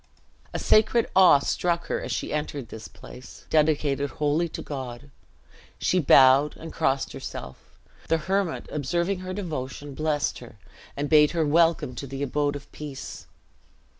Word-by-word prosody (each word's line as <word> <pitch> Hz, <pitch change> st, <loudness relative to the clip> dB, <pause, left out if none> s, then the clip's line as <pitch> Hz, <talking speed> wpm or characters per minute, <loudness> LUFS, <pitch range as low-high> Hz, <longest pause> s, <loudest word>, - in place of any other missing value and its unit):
A -, -, -3 dB
sacred 220 Hz, +2 st, +3 dB
awe 185 Hz, -5 st, +8 dB
struck 170 Hz, +4 st, -1 dB
her -, -, -2 dB
as -, -, -5 dB
she -, -, -3 dB
entered 145 Hz, -5 st, -4 dB
this 110 Hz, -1 st, -9 dB
place, 125 Hz, +1 st, -13 dB
dedicated 150 Hz, -2 st, +2 dB
wholly 150 Hz, +4 st, 0 dB
to -, -, -7 dB
God. 130 Hz, -1 st, -7 dB, 0.7 s
She 185 Hz, -, +1 dB
bowed, 135 Hz, -1 st, +5 dB
and 165 Hz, -, -9 dB
crossed 135 Hz, 0 st, 0 dB
herself. 65 Hz, -, -9 dB, 0.3 s
The 165 Hz, -, +2 dB
hermit, 190 Hz, +2 st, -1 dB
observing 170 Hz, +6 st, -1 dB
her 185 Hz, 0 st, -6 dB
devotion, 145 Hz, -7 st, -5 dB
blessed 150 Hz, 0 st, -1 dB
her, 120 Hz, -3 st, -13 dB, 0.4 s
and 145 Hz, +1 st, -1 dB
bade 150 Hz, 0 st, +6 dB
her 160 Hz, -, +2 dB
welcome 165 Hz, -3 st, +2 dB
to 140 Hz, +3 st, -7 dB
the 135 Hz, +2 st, -5 dB
abode 145 Hz, +1 st, -1 dB
of 140 Hz, 0 st, -8 dB
peace. 145 Hz, -3 st, -8 dB
150 Hz, 150 wpm, -25 LUFS, 135-165 Hz, 0.7 s, awe